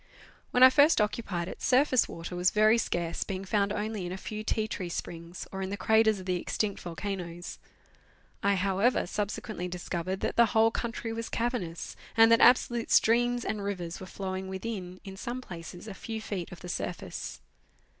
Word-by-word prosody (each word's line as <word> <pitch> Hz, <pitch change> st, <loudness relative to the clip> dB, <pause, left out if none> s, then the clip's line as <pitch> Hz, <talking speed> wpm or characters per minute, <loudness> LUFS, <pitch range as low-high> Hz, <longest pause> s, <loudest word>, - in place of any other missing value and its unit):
When 250 Hz, -, +4 dB
I 260 Hz, -, +10 dB
first 290 Hz, +2 st, +5 dB
occupied 210 Hz, -5 st, -1 dB
it, -, -, -8 dB
surface 255 Hz, -1 st, +4 dB
water 170 Hz, +2 st, -6 dB
was 180 Hz, +1 st, +3 dB
very 215 Hz, +2 st, +4 dB
scarce, 170 Hz, -5 st, -1 dB
being 195 Hz, -1 st, -5 dB
found 200 Hz, +1 st, +1 dB
only 210 Hz, -1 st, -2 dB
in -, -, -5 dB
a 185 Hz, -, -4 dB
few 215 Hz, +2 st, -6 dB
tea 215 Hz, 0 st, 0 dB
tree 185 Hz, -5 st, -4 dB
springs, 170 Hz, +1 st, -6 dB
or 190 Hz, -, -5 dB
in 190 Hz, -, -2 dB
the 200 Hz, -, -3 dB
craters 220 Hz, -1 st, +3 dB
of 185 Hz, -, -9 dB
the 180 Hz, -1 st, 0 dB
extinct 205 Hz, -2 st, -2 dB
volcanoes. 175 Hz, 0 st, -5 dB, 0.8 s
I, 200 Hz, 0 st, +3 dB
however, 195 Hz, +6 st, +2 dB
subsequently 205 Hz, 0 st, -3 dB
discovered 180 Hz, +1 st, -3 dB
that -, -, -2 dB
the 235 Hz, -1 st, +7 dB
whole 225 Hz, +1 st, +6 dB
country 230 Hz, 0 st, -3 dB
was 230 Hz, 0 st, -4 dB
cavernous, 230 Hz, -9 st, -3 dB, 0.2 s
and 225 Hz, 0 st, +7 dB
that 230 Hz, -, +6 dB
absolute 240 Hz, -1 st, +4 dB
streams 240 Hz, +1 st, +3 dB
and 210 Hz, -2 st, -2 dB
rivers 180 Hz, -4 st, -4 dB
were 185 Hz, -, -8 dB
flowing 190 Hz, 0 st, -4 dB
within, 190 Hz, -2 st, -5 dB
in 195 Hz, -1 st, -9 dB
some 240 Hz, +4 st, -4 dB
places, 175 Hz, -3 st, -9 dB
a 210 Hz, -, -6 dB
few 225 Hz, +3 st, -5 dB
feet 200 Hz, -5 st, -5 dB
of 175 Hz, -, -10 dB
the 180 Hz, -, -8 dB
surface. 170 Hz, -, -4 dB
200 Hz, 185 wpm, -29 LUFS, 180-225 Hz, 0.8 s, I